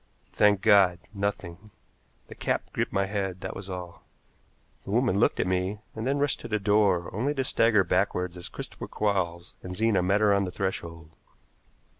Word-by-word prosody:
Thank 105 Hz, -2 st, +4 dB
God! 100 Hz, -4 st, +5 dB, 0.2 s
Nothing. 100 Hz, -1 st, -4 dB, 0.6 s
The -, -, -10 dB
cap -, -, -2 dB
gripped -, -, -1 dB
my 100 Hz, 0 st, +1 dB
head, 95 Hz, -2 st, -3 dB
that -, -, -5 dB
was 100 Hz, 0 st, -8 dB
all. 90 Hz, -2 st, -7 dB, 0.8 s
The -, -, -10 dB
woman 115 Hz, -2 st, +2 dB
looked -, -, +2 dB
at -, -, +2 dB
me, 95 Hz, +2 st, -1 dB, 0.2 s
and 110 Hz, +2 st, -3 dB
then 140 Hz, +1 st, +1 dB
rushed 145 Hz, -1 st, 0 dB
to -, -, -7 dB
the 110 Hz, -, 0 dB
door, 100 Hz, -4 st, +2 dB
only 130 Hz, +9 st, -1 dB
to 135 Hz, -, 0 dB
stagger 115 Hz, -5 st, +3 dB
backward 90 Hz, 0 st, 0 dB
as 90 Hz, 0 st, -6 dB
Christopher -, -, -8 dB
Quarles 90 Hz, -4 st, -2 dB
and 90 Hz, 0 st, -7 dB
Zena 110 Hz, -1 st, +2 dB
met 95 Hz, +3 st, +2 dB
her 105 Hz, -1 st, +4 dB
on 100 Hz, 0 st, +2 dB
the 90 Hz, -, -5 dB
threshold. 85 Hz, -4 st, -4 dB
100 Hz, 180 wpm, -27 LUFS, 90-105 Hz, 0.8 s, God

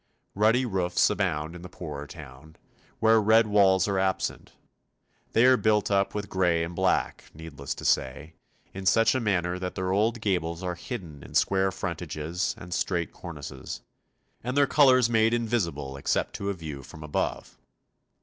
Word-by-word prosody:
Ruddy 110 Hz, +5 st, +3 dB
roofs 95 Hz, -5 st, +1 dB
abound 85 Hz, -6 st, -2 dB
in 90 Hz, -, -9 dB
the 90 Hz, -, -9 dB
poorer 75 Hz, -5 st, -7 dB
town, 75 Hz, 0 st, -12 dB, 0.4 s
where 110 Hz, 0 st, +5 dB
red 110 Hz, +2 st, +5 dB
walls 100 Hz, -3 st, +4 dB
are 100 Hz, -2 st, 0 dB
absent; 95 Hz, 0 st, -2 dB, 0.8 s
they 115 Hz, +2 st, +5 dB
are 130 Hz, 0 st, +6 dB
built 105 Hz, -3 st, +1 dB
up 100 Hz, 0 st, +1 dB
with 100 Hz, -1 st, -3 dB
grey 90 Hz, -3 st, +1 dB
and 85 Hz, +1 st, -5 dB
black, -, -, 0 dB
needless 75 Hz, -4 st, -6 dB
to -, -, -9 dB
say, 75 Hz, +5 st, 0 dB, 0.4 s
in 95 Hz, 0 st, -5 dB
such 115 Hz, +5 st, +4 dB
a 130 Hz, -, 0 dB
manner 90 Hz, -5 st, 0 dB
that 90 Hz, 0 st, -4 dB
their 95 Hz, 0 st, -2 dB
old 110 Hz, +4 st, +1 dB
gables 90 Hz, -4 st, -1 dB
are 90 Hz, -1 st, -2 dB
hidden 85 Hz, -, -7 dB
in -, -, -12 dB
square 95 Hz, 0 st, +2 dB
frontages 85 Hz, -2 st, -3 dB
and 90 Hz, 0 st, -8 dB
straight 85 Hz, -2 st, -1 dB
cornices, 75 Hz, -5 st, -8 dB, 0.6 s
and 125 Hz, +3 st, -3 dB
their 140 Hz, -, +6 dB
colours 130 Hz, -4 st, +5 dB
made 115 Hz, 0 st, +3 dB
invisible 85 Hz, -, -2 dB
except 70 Hz, -, -1 dB
to 100 Hz, -, -3 dB
a 100 Hz, -, -2 dB
view 75 Hz, -5 st, -7 dB
from 75 Hz, +4 st, -12 dB
above. 75 Hz, -, -3 dB
95 Hz, 165 wpm, -27 LUFS, 80-105 Hz, 0.8 s, are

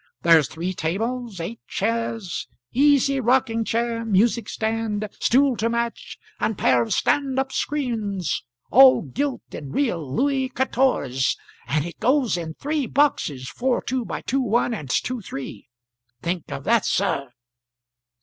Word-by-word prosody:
There's 165 Hz, -4 st, +6 dB
three 170 Hz, +4 st, -4 dB
tables, 220 Hz, +6 st, -3 dB
eight 205 Hz, +8 st, -5 dB
chairs, 225 Hz, -3 st, -2 dB, 0.3 s
easy 275 Hz, 0 st, +4 dB
rocking 235 Hz, -2 st, +2 dB
chair, 230 Hz, +1 st, -1 dB
music 225 Hz, +1 st, +2 dB
stand, 220 Hz, -1 st, -2 dB
stool 265 Hz, +1 st, +3 dB
to 230 Hz, -, 0 dB
match, 235 Hz, 0 st, -3 dB, 0.2 s
and 220 Hz, -, -1 dB
pair 125 Hz, -1 st, +3 dB
of 115 Hz, -, -3 dB
stand 275 Hz, -2 st, +1 dB
up 265 Hz, 0 st, 0 dB
screens, 215 Hz, -, -2 dB, 0.3 s
all 260 Hz, -2 st, +7 dB
gilt 265 Hz, -, -3 dB
in 140 Hz, -, -7 dB
real 230 Hz, -, 0 dB
Louey 265 Hz, -, 0 dB
catorse; 255 Hz, -, +1 dB, 0.3 s
and 150 Hz, +1 st, 0 dB
it 170 Hz, -, -8 dB
goes 260 Hz, -4 st, +2 dB
in 165 Hz, -2 st, -5 dB
three 295 Hz, -2 st, -2 dB
boxes 150 Hz, -, +1 dB
4 255 Hz, 0 st, -1 dB
2 255 Hz, -1 st, -1 dB
by -, -, -5 dB
2 270 Hz, +2 st, 0 dB
1 240 Hz, 0 st, +1 dB
and 150 Hz, -, -6 dB
2 250 Hz, -, -1 dB
3. 135 Hz, -, -8 dB, 0.5 s
Think 170 Hz, -1 st, -3 dB
of 135 Hz, -, -5 dB
that, 230 Hz, 0 st, +3 dB
sir. 140 Hz, -9 st, 0 dB
230 Hz, 140 wpm, -23 LUFS, 175-260 Hz, 0.5 s, all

